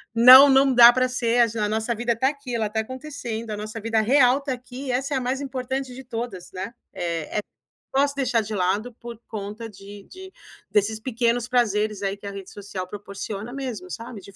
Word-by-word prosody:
Não, 255 +4 +10
não 270 0 +5
dá 240 -1 +10
pra 255 +1 +2
ser, 240 -1 +1 0.2
a 210 -1 0
nossa 220 +2 -1
vida 235 +1 -1
tá 260 +4 +2
aqui, 280 -4 -6
ela 220 -2 -1
tá 220 +1 -2
acontecendo, 240 -2 -6
a 210 - -4
nossa 215 +2 -6
vida 225 0 +1
real 255 +3 +4
tá 280 -1 -4
aqui 250 +2 -9
e - - -1
essa 270 +4 -1
é 270 - +1
a - - -2
mais 255 +2 -2
importante 265 -1 -4
de 260 - -9
todas", 230 -7 -6
né. 190 +6 -6 0.3
É 165 +1 -3
é - - +2 0.5
posso 280 +1 +2
deixar 250 -4 +1
de 215 0 -5
lado 200 +5 -1
por 235 -1 -9
conta 215 +1 -6
de 200 0 -12
de 380 0 -12 0.4
desses 215 +1 +1
pequenos 240 0 0
prazeres 215 -4 +1
aí 195 0 -1
que 200 - -20
a - - -4
rede 195 -1 -9
social 195 -2 -7
proporciona 205 +2 -7
mesmo, 245 -9 -6
sabe, 230 +1 -7
de 200 - -14
235 Hz, 210 wpm, -24 LUFS, 210-255 Hz, 0.5 s, Não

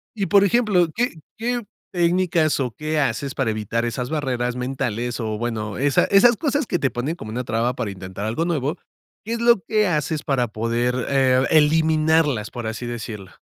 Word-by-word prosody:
Y, 200 -3 -1
por 200 -1 +5
ejemplo, 200 -5 +3
¿qué 245 +2 0 0.2
qué 240 +2 -1 0.3
técnicas 170 -3 +2
o 125 -3 -1
qué 155 +4 -2
haces 135 +1 -1
para 130 -5 0
evitar 110 +2 -2
esas 125 +1 -3
barreras 125 -5 -1
mentales? 125 -2 -3
O, 110 -2 -2
bueno, 110 -3 -3
esa 140 0 +3
esas 225 +4 +5
cosas 290 -2 0
que 175 - -1
te 135 - +1
ponen 130 +7 -3
como 110 -10 -8
una 125 +3 -3
traba 115 +2 0
para 115 -6 -3
intentar 95 +1 -7
algo 115 +10 -1
nuevo, 155 -1 -1 0.5
¿qué 230 - -3
es 235 - -3
lo 235 -3 +5
que 215 +4 +1
haces 155 -2 -1
para 125 -4 0
poder, 115 +3 -1
eh, 130 -2 +3
eliminarlas? 155 -5 +3
Por 120 -2 -6
así 110 +2 -5
decirlo. 110 -5 -6
135 Hz, 185 wpm, -22 LUFS, 120-170 Hz, 0.5 s, por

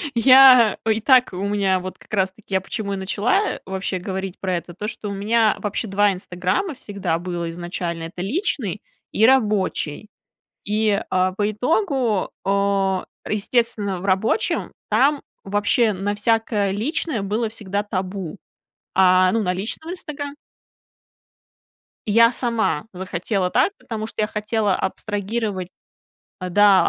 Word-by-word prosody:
Я, 255 -2 +7
ой, 220 -1 +2
и - - -4
так 255 +1 +5
у - - -5
меня, 200 -2 +1
вот, 185 +1 -7
как - - -18
раз-таки 190 0 -2
я 190 - +2
почему 200 0 -4
и - - -1
начала, 205 - 0 0.2
э, - - -10
вообще 190 0 -3
говорить 190 0 -5
про 185 -2 -1
это, 175 0 -8
то, 210 +4 -5
что 210 -1 -5
у - - -4
меня 215 +2 +2
вообще 210 +2 -3
2" 200 +1 +3
Инстаграма" 185 - -2
всегда 195 -8 -3
было 175 -1 -4
изначально. 175 -1 -4
Это 175 +2 -7
личный 315 - -2 0.3
и 220 - +3
рабочий. 210 - +1 0.6
И, 210 -1 +1
а, 185 0 +2
по 205 +2 0
итогу, 250 - 0
а, 195 -1 +1 0.2
естественно, 210 -3 0
в - - -9
рабочем 195 - +1 0.2
там 275 +7 +3 0.2
вообще 205 +3 +2
на 200 +2 -2
всякое 210 -2 +1
личное 240 - -2
было 215 +3 -1
всегда 205 -2 -3
табу. 190 -2 -4 0.6
А, 185 -1 +5
ну, 225 -1 +1
на 180 -2 0
личном 225 - -4
"Инстагра" 290 -5 -6 1.7
Я 230 +3 +6
сама 230 - -1
захотела 185 +1 -2
так, 260 - +2
потому 220 -2 -5
что 220 - -4
я 210 - +1
хотела 210 -2 0
абстрагировать 205 -1 -3 0.7
А, 185 - -4
да, 205 0 +5
205 Hz, 145 wpm, -22 LUFS, 190-225 Hz, 1.7 s, Я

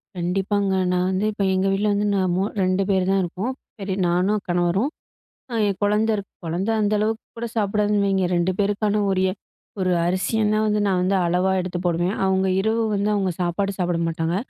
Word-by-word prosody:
கண்டிப்பாங்க. 195 +3 0 0.2
நான் 180 0 +1
வந்து 190 +3 0
இப்ப, 205 -1 -2
எங்க 190 +1 +1
வீட்ல 200 +2 +1
வந்து 205 +1 0
நான் 185 -2 +1
மூ 190 - +1 0.2
2 185 +1 +1
பேர் 190 -2 +2
தான் 195 0 +2
இருக்கோம். 195 +9 -3 0.3
சரி 195 -1 -3
நானும், 185 +4 +1
கணவரும். 175 - +1 0.6
அ - - -5
என் 195 - -1
குழந்தை 210 +2 +2
இருக்கு. 200 -1 -6
குழந்தை 180 +7 -1
அந்த 210 +1 +1
அளவுக்கு 220 +1 -1
கூட 235 - -3
சாப்பிடாதுன்னு 210 0 +1
வைங்க. 195 -1 +1
2 175 +2 +1
பேருக்கான 205 +1 +1
உரிய 190 0 +2 0.5
ஒரு 185 -1 +1
அரிசிய 185 +5 0
நான் 215 0 +2
வந்து 210 0 +1
நான் 185 -2 +2
வந்து 190 +2 +1
அளவா 180 +2 +1
எடுத்து 180 -1 -3
போடுவேன். 175 +3 0
அவுங்க 190 0 +2
இரவு 225 +2 +1
வந்து, 200 +1 0
அவுங்க 195 -3 0
சாப்பாடு 180 +3 0
சாப்பிட 175 -1 0
மாட்டாங்க. 165 +1 -1
195 Hz, 185 wpm, -23 LUFS, 180-205 Hz, 0.6 s, பேர்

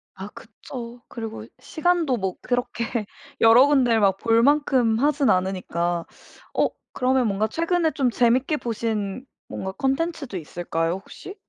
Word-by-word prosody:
아 190 +1 -7
그쵸. 240 +2 -10
그리고 225 -2 -7
시간도 325 -5 0
뭐 190 -2 -2
그렇게 240 -2 -2 0.4
여러 230 +4 +7
군데 255 -5 +3
막 200 -2 +4
볼 230 0 +4
만큼 265 -5 +3
하진 290 0 +2
않으니까. 175 -2 -1 0.5
어 - - +2 0.2
그러면 255 0 +2
뭔가 205 +1 0
최근에 335 - +1
좀 265 -5 0
재밌게 250 +6 +2
보신 225 -1 -3 0.2
뭔가 190 - -5
콘텐츠도 270 - -2
있을까요, 165 0 -2
혹시? 195 - -9
235 Hz, 280 characters per minute, -24 LUFS, 200-270 Hz, 0.5 s, 여러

